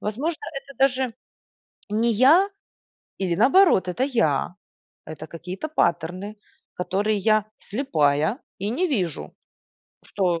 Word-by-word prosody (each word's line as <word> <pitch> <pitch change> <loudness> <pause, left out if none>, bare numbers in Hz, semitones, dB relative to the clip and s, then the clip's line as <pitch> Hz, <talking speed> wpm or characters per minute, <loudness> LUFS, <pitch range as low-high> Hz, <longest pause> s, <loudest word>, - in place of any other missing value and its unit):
Возможно, 275 +11 -3 0.2
это 275 - -15
даже 260 -3 +1 0.8
не 225 +3 +1
я 295 - +5 0.7
или 180 -3 -1
наоборот 275 - +5
это 180 +8 -1
я, 185 - 0 0.5
это 155 0 -8
какие-то 180 - -6
паттерны, 180 - -1 0.4
которые 200 +4 -1
я 215 +1 +2
слепая 160 - 0 0.2
и 200 +2 -3
не 350 +11 0
вижу, 185 - -2 0.7
что 180 -4 -1
210 Hz, 110 wpm, -24 LUFS, 180-265 Hz, 0.8 s, я